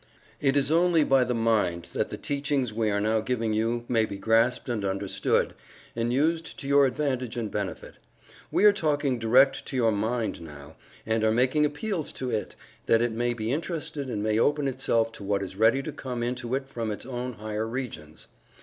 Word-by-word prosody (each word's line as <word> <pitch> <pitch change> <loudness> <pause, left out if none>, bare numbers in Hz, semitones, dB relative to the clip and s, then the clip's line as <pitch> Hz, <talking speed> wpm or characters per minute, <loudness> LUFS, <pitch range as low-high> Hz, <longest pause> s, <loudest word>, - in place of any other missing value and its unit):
It 135 0 +2
is 140 +1 +2
only 170 -1 +4
by 135 -2 +4
the 125 0 -1
mind 105 -7 +1
that - - -1
the - - -5
teachings 140 -4 -1
we 110 -1 0
are 100 0 +1
now 110 +2 +1
giving 115 -1 -1
you 115 +2 0
may 115 -3 +2
be 100 - -6
grasped 115 +6 +2
and 115 -5 -2
understood, 95 0 0 0.4
and 115 +1 -1
used 160 +5 0
to 140 - -6
your 140 0 +5
advantage 130 -3 -2
and 110 -3 -3
benefit. 100 -2 -5 0.5
We 210 - +2
are 210 - +8
talking 145 -8 0
direct 130 +4 +4
to - - -5
your 115 -3 +3
mind 110 -1 -1
now, 75 -1 -11 0.3
and 110 0 0
are 110 - +4
making 130 +6 +3
appeals 160 +2 -3
to 130 -1 -4
it, 105 - -3 0.3
that 115 +1 +4
it 120 - 0
may 120 +2 -1
be 110 0 -2
interested 150 -3 -3
and 105 -4 -2
may 110 0 +1
open 145 +3 +2
itself 115 -4 +1
to 105 - -11
what 100 0 0
is 95 0 -7
ready 115 +6 +3
to - - -4
come 125 -3 -5
into 125 0 -2
it 135 0 -3
from 115 -4 -4
its 105 - -5
own 125 -1 -4
higher 110 0 -4
regions. 110 - -6
120 Hz, 200 wpm, -27 LUFS, 110-135 Hz, 0.5 s, are